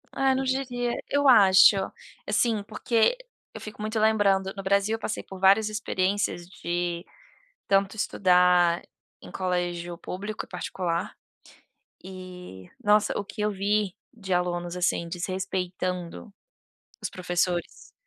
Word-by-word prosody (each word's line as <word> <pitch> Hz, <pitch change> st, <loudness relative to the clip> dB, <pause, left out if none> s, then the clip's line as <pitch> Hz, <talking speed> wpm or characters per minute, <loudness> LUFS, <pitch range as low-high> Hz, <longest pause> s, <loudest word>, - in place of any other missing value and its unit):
eh, 270 Hz, -1 st, +2 dB
não 265 Hz, -, 0 dB
diria 250 Hz, -2 st, -1 dB, 0.2 s
Eu 285 Hz, 0 st, +2 dB
acho, 200 Hz, -5 st, +7 dB, 0.5 s
assim, 225 Hz, -4 st, +1 dB
porque 230 Hz, -, +1 dB, 0.4 s
eu -, -, -8 dB
fico 215 Hz, 0 st, -9 dB
muito 215 Hz, +1 st, -2 dB
lembrando, 200 Hz, -3 st, +2 dB
no 195 Hz, -, -6 dB
Brasil 200 Hz, +3 st, +2 dB
eu -, -, -8 dB
passei 215 Hz, -, -4 dB
por 190 Hz, -1 st, -10 dB
várias 200 Hz, +3 st, +5 dB
experiências 200 Hz, -3 st, -1 dB
de 175 Hz, -1 st, -3 dB, 0.6 s
tanto 195 Hz, +1 st, +2 dB
estudar 180 Hz, -4 st, +3 dB, 0.4 s
em -, -, -11 dB
colégio 175 Hz, -2 st, -2 dB
público, 205 Hz, +4 st, -5 dB
e -, -, -21 dB
particular, 175 Hz, -1 st, -3 dB, 0.9 s
eh, 180 Hz, -, -10 dB
nossa! 210 Hz, 0 st, +3 dB
O 205 Hz, -, -3 dB
que 205 Hz, +2 st, -9 dB
eu 210 Hz, 0 st, +1 dB
vi 200 Hz, -1 st, 0 dB, 0.2 s
de 195 Hz, -5 st, -3 dB
alunos, 175 Hz, 0 st, -1 dB
assim, 175 Hz, -1 st, 0 dB
desrespeitando 180 Hz, +1 st, -4 dB, 0.7 s
os -, -, -2 dB
professores, 175 Hz, -1 st, -2 dB
190 Hz, 125 wpm, -26 LUFS, 180-210 Hz, 0.9 s, acho